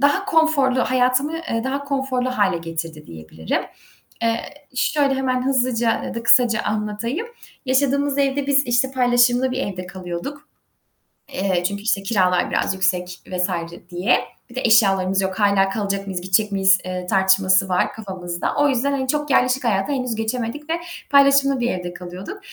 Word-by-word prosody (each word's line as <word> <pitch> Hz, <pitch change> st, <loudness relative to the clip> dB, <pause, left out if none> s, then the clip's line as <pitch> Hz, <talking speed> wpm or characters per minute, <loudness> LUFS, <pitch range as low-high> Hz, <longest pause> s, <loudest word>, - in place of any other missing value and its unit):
daha 285 Hz, +8 st, +2 dB
konforlu, 315 Hz, -8 st, +2 dB
hayatımı, 255 Hz, +5 st, +1 dB
eee, 230 Hz, -9 st, -3 dB
daha 275 Hz, +2 st, -2 dB
konforlu 270 Hz, -2 st, -1 dB
hâle 200 Hz, -8 st, +1 dB
getirdi 165 Hz, -2 st, -6 dB
diyebilirim. 80 Hz, 0 st, -4 dB, 0.6 s
Eee, 230 Hz, 0 st, +1 dB, 0.4 s
şöyle 280 Hz, +1 st, +1 dB
hemen 255 Hz, -1 st, -1 dB
hızlıca 245 Hz, -3 st, +1 dB
ya -, -, -6 dB
da 230 Hz, -, -4 dB
kısaca 235 Hz, -1 st, +4 dB
anlatayım. 215 Hz, -, -3 dB, 0.4 s
Yaşadığımız 280 Hz, +2 st, +1 dB
evde 280 Hz, 0 st, 0 dB
biz 280 Hz, 0 st, +3 dB
işte 245 Hz, +2 st, +1 dB
paylaşımlı 245 Hz, 0 st, +3 dB
bir 255 Hz, -, -3 dB
evde 185 Hz, -6 st, -4 dB
kalıyorduk, 185 Hz, -, -7 dB, 0.9 s
eee, 185 Hz, -2 st, 0 dB
çünkü 200 Hz, +1 st, -6 dB
işte 205 Hz, -2 st, 0 dB
kiralar 185 Hz, -4 st, +1 dB
biraz -, -, 0 dB
yüksek 180 Hz, -1 st, -1 dB
vs. 180 Hz, 0 st, -1 dB, 0.4 s
diye. 180 Hz, +6 st, +2 dB, 0.3 s
Bir 240 Hz, -, -14 dB
de 255 Hz, -, -2 dB
eşyalarımız 195 Hz, -4 st, +3 dB
yok, 190 Hz, +1 st, -3 dB
hâlâ 200 Hz, -2 st, +3 dB
kalacak 200 Hz, -1 st, -3 dB
mıyız, 185 Hz, -2 st, -4 dB
gidecek 190 Hz, +3 st, +1 dB
miyiz, 190 Hz, -1 st, +4 dB
eee, 180 Hz, -1 st, -5 dB
tartışması 190 Hz, 0 st, +3 dB
var 180 Hz, 0 st, +1 dB
kafamızda. 185 Hz, -5 st, -4 dB
O 290 Hz, 0 st, +3 dB
yüzden 275 Hz, +1 st, 0 dB
hani 265 Hz, -2 st, -2 dB
çok 295 Hz, +2 st, -1 dB
yerleşik 255 Hz, +1 st, +2 dB
hayata 210 Hz, +2 st, 0 dB
henüz 255 Hz, -4 st, -2 dB
geçemedik 235 Hz, +6 st, -4 dB
ve -, -, +1 dB, 0.4 s
paylaşımlı 275 Hz, -1 st, +4 dB
bir 240 Hz, 0 st, 0 dB
evde 180 Hz, -1 st, -5 dB
kalıyorduk. 180 Hz, -, -8 dB
230 Hz, 155 wpm, -21 LUFS, 190-265 Hz, 0.9 s, kısaca